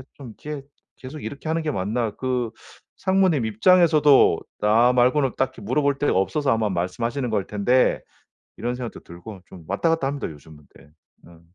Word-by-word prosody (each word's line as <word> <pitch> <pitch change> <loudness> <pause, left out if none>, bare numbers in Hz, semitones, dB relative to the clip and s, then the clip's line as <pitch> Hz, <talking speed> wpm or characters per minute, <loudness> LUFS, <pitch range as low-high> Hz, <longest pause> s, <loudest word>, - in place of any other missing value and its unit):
좀 125 -6 -11
이렇게 145 -2 -7 0.3
계속 140 +4 -9
이렇게 145 +2 -6
하는 165 +1 0
게 155 - -1
맞나 110 +1 -2
그 125 -3 -2 0.5
상무님 190 - +2
입장에서도 150 - +4 0.2
나 115 +4 +4
말고는 125 +2 +2
딱히 130 -2 -2
물어볼 140 +6 0
데가 145 - +1
없어서 135 +8 0
아마 110 -2 0
말씀하시는 115 +8 -2
걸 100 -3 -1
텐데.' 115 +5 +1 0.6
이런 120 +1 -3
생각도 125 -2 -7
들고 90 +4 -11
좀 90 - -13
왔다 100 - 0
갔다 165 -4 0
합니다, 140 0 -3
요즘은. 75 0 -14 0.2
네. - - -18 0.4
음. 85 -1 -17
125 Hz, 350 characters per minute, -23 LUFS, 105-145 Hz, 0.6 s, 입장에서도